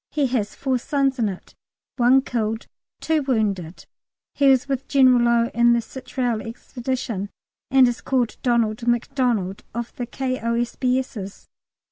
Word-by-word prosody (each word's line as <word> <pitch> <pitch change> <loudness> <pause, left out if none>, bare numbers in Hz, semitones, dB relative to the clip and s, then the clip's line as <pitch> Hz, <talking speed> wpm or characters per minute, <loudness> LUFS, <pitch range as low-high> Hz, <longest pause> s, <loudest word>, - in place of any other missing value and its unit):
He 295 -2 0
has 210 -5 -1
four 265 -2 -1
sons 275 0 0
in 220 -3 +2
it, 185 - -9 0.4
one 255 +2 +5
killed, 225 -3 -2 0.4
two 320 -1 +1
wounded. 205 - -1 0.5
He 280 - +2
was 265 -1 +4
with 270 -1 -3
General 255 -3 +5
Low 235 0 +2
in 235 0 +4
the 235 - +3
Chitral 245 -2 -3
Expedition, 235 -3 -4 0.4
and 265 -1 +6
is 240 0 -2
called 250 -4 0
Donald 235 -2 0
Macdonald, 240 -5 0
of 235 0 -5
the 245 - -3
K.O.S.B.'s. 245 -3 -2
240 Hz, 135 wpm, -23 LUFS, 225-260 Hz, 0.5 s, and